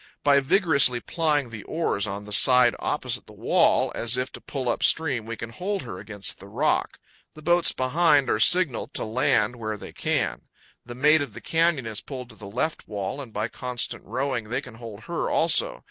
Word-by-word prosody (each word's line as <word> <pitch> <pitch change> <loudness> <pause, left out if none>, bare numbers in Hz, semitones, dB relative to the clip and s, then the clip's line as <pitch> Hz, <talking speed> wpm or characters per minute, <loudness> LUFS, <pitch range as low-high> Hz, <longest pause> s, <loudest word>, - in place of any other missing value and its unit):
By 140 -1 +5
vigorously 140 - +3
plying 150 -4 0
the 110 -2 -7
oars 155 -11 -1
on 100 +1 -5
the 105 - -10
side 125 +2 +5
opposite - - -2
the - - -14
wall, - - +2
as 120 +2 0
if 130 +1 -2
to - - -11
pull 135 -3 -5
up 120 - -1
stream, 130 -9 +2
we 115 0 -5
can 115 0 -7
hold 195 - -4
her 90 -7 -8
against 100 -2 -4
the - - -12
rock. - - 0 0.4
The 155 - -13
boats 175 +2 +4
behind 145 +2 +3
are 105 - 0
signaled 175 +1 +3
to - - -1
land 110 0 +1
where 110 -2 -4
they - - -10
can. - - -2 0.4
The 120 0 -9
"Maid 150 +4 +4
of 130 -8 -6
the - - -7
Canyon" 165 -5 +1
is 110 -1 -3
pulled 130 -3 -8
to 110 - -13
the 105 - -11
left 130 +9 -3
wall, 105 +6 -4
and, 125 -5 -10
by 105 +1 -2
constant 125 0 -4
rowing, 130 -4 -3
they 125 - -1
can 125 -3 -11
hold 115 -2 -10
her 170 +6 -3
also. 165 -1 +2
125 Hz, 205 wpm, -25 LUFS, 110-150 Hz, 0.4 s, By